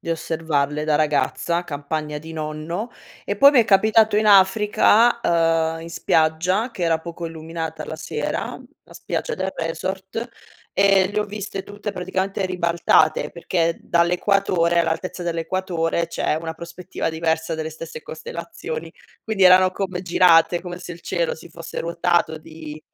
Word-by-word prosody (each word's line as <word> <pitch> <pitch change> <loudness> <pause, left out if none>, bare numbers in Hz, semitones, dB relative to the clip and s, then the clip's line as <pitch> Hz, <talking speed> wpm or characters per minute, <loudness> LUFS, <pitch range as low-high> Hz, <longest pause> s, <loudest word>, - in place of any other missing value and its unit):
di 165 - -5
osservarle 155 -3 -1
da 155 -1 +2
ragazza, 155 +3 0
campagna 150 -1 -4
di 160 +2 -10
nonno. 160 +8 -4 0.3
E - - -2
poi 280 +1 +7
m'è 245 -4 +5
capitato 215 +1 +4
in 215 +1 +2
Africa, 210 +4 +5
ehm, 165 -3 +1
in 165 - -8
spiaggia 170 +8 +1
che 185 - -6
era 165 -1 +2
poco 170 +1 -7
illuminata 160 -1 -6
la - - -6
sera, 160 - -4 0.2
la - - -18
spiaggia - - -4
del 190 0 -3
resort 190 +7 -4 0.4
e 195 -1 +4
le 210 - -1
ho - - 0
viste 200 -1 -6
tutte 205 +1 -6
praticamente 190 +1 -2
ribaltate, 170 -3 +2
perché 170 -1 -1
dall'equatore 175 0 +2
all'altezza 175 +2 -2
dell'equatore, 170 0 -1
c'è 170 - -1
una 160 -1 -5
prospettiva 170 +3 -5
diversa 160 0 -1
delle 160 0 -4
stesse 160 0 -8
costellazioni, 170 - -7 0.3
quindi 215 -3 -1
erano 185 0 +7
come 185 -1 -4
girate 170 -1 +4
come 175 -1 -7
se 180 - -9
il 170 - -11
cielo 170 -3 -1
si 165 - -13
fosse 165 0 -8
ruotato 170 -1 0
di 155 -1 -10
170 Hz, 145 wpm, -22 LUFS, 160-190 Hz, 0.4 s, poi